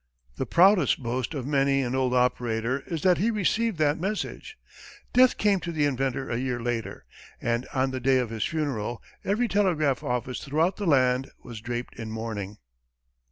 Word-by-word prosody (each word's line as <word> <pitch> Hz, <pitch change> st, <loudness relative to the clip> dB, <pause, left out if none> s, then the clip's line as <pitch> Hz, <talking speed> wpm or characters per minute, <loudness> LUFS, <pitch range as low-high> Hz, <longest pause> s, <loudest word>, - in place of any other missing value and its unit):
The -, -, -2 dB
proudest 175 Hz, -, +4 dB
boast 125 Hz, +5 st, -2 dB
of 130 Hz, -4 st, -4 dB
many 140 Hz, -1 st, +2 dB
an 125 Hz, 0 st, -2 dB
old 130 Hz, -1 st, +1 dB
operator 125 Hz, 0 st, +1 dB
is 165 Hz, -3 st, -4 dB
that 180 Hz, -2 st, +4 dB
he 215 Hz, +5 st, +2 dB
received 220 Hz, -1 st, 0 dB
that 150 Hz, 0 st, +2 dB
message. 210 Hz, -, -4 dB, 0.6 s
Death 255 Hz, 0 st, +5 dB
came 205 Hz, -2 st, +3 dB
to 175 Hz, -, -5 dB
the 155 Hz, -3 st, +1 dB
inventor 135 Hz, -1 st, -1 dB
a 115 Hz, -, -2 dB
year 125 Hz, -1 st, -2 dB
later, 115 Hz, -1 st, -4 dB, 0.3 s
and 120 Hz, +1 st, -1 dB
on 130 Hz, 0 st, 0 dB
the 130 Hz, -, -3 dB
day 130 Hz, +1 st, +3 dB
of 125 Hz, -3 st, -1 dB
his 110 Hz, -2 st, -2 dB
funeral, 130 Hz, -8 st, -2 dB, 0.2 s
every 215 Hz, +5 st, +1 dB
telegraph 165 Hz, -, +1 dB
office 125 Hz, 0 st, -3 dB
throughout 160 Hz, +6 st, +1 dB
the 205 Hz, -, -3 dB
land 130 Hz, -3 st, +3 dB
was 115 Hz, -3 st, -9 dB
draped 120 Hz, +1 st, -5 dB
in 115 Hz, -1 st, -5 dB
mourning. 110 Hz, -2 st, -5 dB
135 Hz, 175 wpm, -26 LUFS, 120-170 Hz, 0.6 s, Death